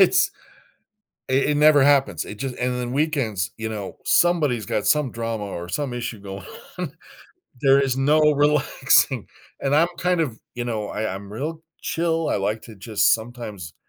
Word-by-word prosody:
it's - - +5 1.0
it 130 +1 +2
it 145 - +1
never 150 -2 +6
happens, 140 -1 +3
it 105 - -7
just 130 +1 -4
and 125 0 -1
then 120 -1 -3
weekends, 135 - 0
you 110 0 -4
know, 105 -3 -6
somebody's 150 - +3
got 105 - -1
some 150 -4 +2
drama 115 -2 -3
or 90 -3 -6
some 140 +5 -2
issue 120 -2 -4
going 95 -1 -8 0.3
on. 175 -6 -3 0.7
There 135 0 +5
is 135 -2 0
no 145 +3 +3
relaxing, 145 -4 +3 0.3
and 140 +1 +1
I'm 165 +3 +4
kind 180 -1 +1
of 125 -9 -2 0.2
,you 120 - -3
know, 110 -3 -3
I 110 -2 -3
I'm 100 +1 -9
real 155 +8 -4 0.2
chill, 165 -1 -1
I - - +1
like 105 +2 -1
to 115 - -11
just 105 +2 +3
sometimes 110 -7 -7
125 Hz, 175 wpm, -23 LUFS, 110-150 Hz, 1.0 s, never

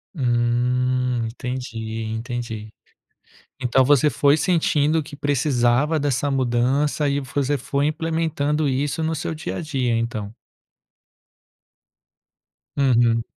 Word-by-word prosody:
Hum, 125 -1 +1
entendi, 115 -2 -5
entendi. 110 -1 -5 0.9
Então 130 +1 +3
você 145 +2 +4
foi 145 0 +3
sentindo 155 -2 +2
que 145 - -11
precisava 140 +1 +1
dessa 145 0 0
mudança 135 +3 +1
e 140 0 0
você 140 +2 -1
foi 140 +3 -1
implementando 155 -1 -1
isso 140 +4 -1
no 160 +1 0
seu 160 +1 -3
dia 155 - -5
a - - -3
dia, 135 -7 -1
então? 110 -2 -3 2.4
Uhum. 120 -4 +3
130 Hz, 105 wpm, -22 LUFS, 120-145 Hz, 2.4 s, você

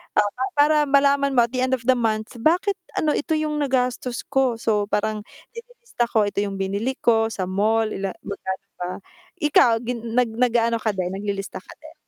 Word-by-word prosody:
ah, - - +5
pa 255 +1 -2
para 300 +1 +5
malaman 280 0 +3
mo 240 - +7
at 235 - -12
the 255 - -1
end 260 0 +1
of 245 - -11
the 255 0 +4
month, 220 +1 -2
bakit, 360 - +2 0.2
ano, 305 - +1
ito 320 - -1
'yong 305 -1 -1
nagastos 255 -3 -1
ko. 270 -3 +2
So 215 -2 0
parang, 215 0 -1 0.3
nililista 470 - -4
ko, 220 -2 +3
ito 200 - -3
'yong 200 -1 -3
binili 200 +7 -2
ko 225 -1 +3
sa 215 -4 -4
mall, 215 +3 +1
ila 195 -1 -3
magkano 190 -1 -5 0.2
ba. 180 - -3 0.5
Ikaw, 295 -5 +5
gin 235 -1 -4
nag 250 -2 +3
nag-aano 235 -1 +2
ka 215 -1 0
din, 180 -1 -2
naglilista 200 0 -4
ka - - -14
din? - - -13
235 Hz, 195 wpm, -23 LUFS, 215-270 Hz, 0.5 s, mo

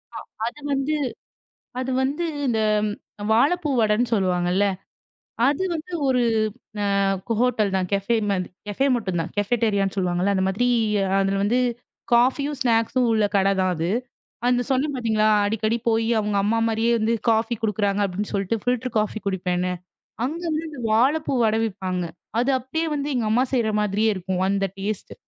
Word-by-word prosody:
அ - - -4 0.3
அது 295 - -7
வந்து 275 +3 0 0.9
அது 260 +1 -2
வந்து 290 +6 -1 0.2
இந்த 225 -3 +1 0.7
வாப்பூ 295 +7 +2
வடன்னு 220 +2 +2
சொல்லுவாங்கள்ல. 180 -1 +1 0.8
அது 290 +6 +1
வந்து 320 +3 -6 0.2
ஒரு, 250 -2 +3 0.6
அ, - - +1 0.5
ஹோட்டல் 225 -5 +1
தான் 185 -1 0
கஃபே 200 +4 +1
மாதிரி 185 -2 -1 0.2
கஃபே 265 +7 0
மட்டும்தான் 185 -6 -2
கஃபட்டீரியான்னு 205 -2 +1
சொல்லுவாங்கள்ல, 180 +2 +1
அந்த 190 - +1
மாதிரி 230 +6 0 0.5
அதுல 195 0 +1
வந்து 240 +5 +2 0.5
காஃபியும் 265 +4 +2
ஸ்னேக்ஸ்ஸும் 235 +1 +2
உள்ள 215 -2 +3
கட 195 0 +3
தான் 185 -1 +1
அது. 165 +2 -2 0.6
அந்த 245 0 +3
சொன்னேன் 275 +2 +1
பாத்தீங்களா, 220 -3 +1 0.2
அடிக்கடி 220 +2 0
போயி 225 0 +1
அவங்க 210 -1 -1
அம்மா 225 +2 +1
மாரியே 225 +1 +1
வந்து 220 +2 +1 0.2
காஃபி 225 +1 +2
குடுக்குறாங்க 205 -1 0
அப்படின்னு 195 +2 -4
சொல்லிட்டு 200 +3 0
ஃபில்டர் 250 0 -1
காஃபி 215 +1 -2
குடிப்பேன்னு. 180 -1 -1 0.5
அங்க 320 +6 -3 0.2
வந்து 310 -4 -8
வாழப்பூ 275 +8 +2
வட 220 0 +2
விப்பாங்க. 185 -4 -3 0.4
அது 250 +3 +1
அப்படியே 320 +6 -3
வந்து 285 0 -2
எங்க 240 -3 0
அம்மா 245 +4 +3
செய்ற 235 -4 +2
மாதிரியே 210 +2 +1
இருக்கும் 185 0 -2
அந்த 195 0 +1
டேஸ்ட்டு. 205 +1 -4
220 Hz, 145 wpm, -23 LUFS, 195-250 Hz, 0.9 s, ஒரு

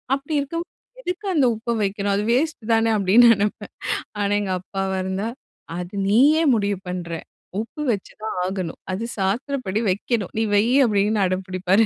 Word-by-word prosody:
"அப்படி 280 +3 -4
இருக்கும்போது 335 +5 -4 0.4
எதுக்கு 365 0 -4
அந்த 280 -4 +4
உப்பை 235 +2 -2
வைக்கணும்? 200 0 0
அது 205 - 0
வேஸ்ட்டு 265 -3 0
தானே" 225 0 +3
அப்டின்னு 210 +5 +6
நெனைப்பேன். 205 0 -2 0.5
ஆனா 200 0 +1
எங்க 190 -2 -1
அப்பாவா 190 0 -3
இருந்தா 195 +4 -2 0.5
"அது 180 +2 -6
நீ 210 +3 +4 0.2
ஏன் 285 -6 +4
முடிவு 200 -2 0
பண்ணுற? 175 -2 -4 0.5
உப்பு 235 +7 -8
வச்சுதான் 210 +1 -6
ஆகணும். 185 -3 -4
அது 220 +5 -2
சாஸ்த்திரப்படி 215 +2 -1
வைக்கணும். 205 +1 -2
நீ - - +2
வை." 205 +2 +4 0.2
அப்டின்னு 205 0 +2
அடம் 185 +1 -2
புடிப்பாரு. 185 +3 +2
205 Hz, 155 wpm, -23 LUFS, 190-235 Hz, 0.5 s, அப்டின்னு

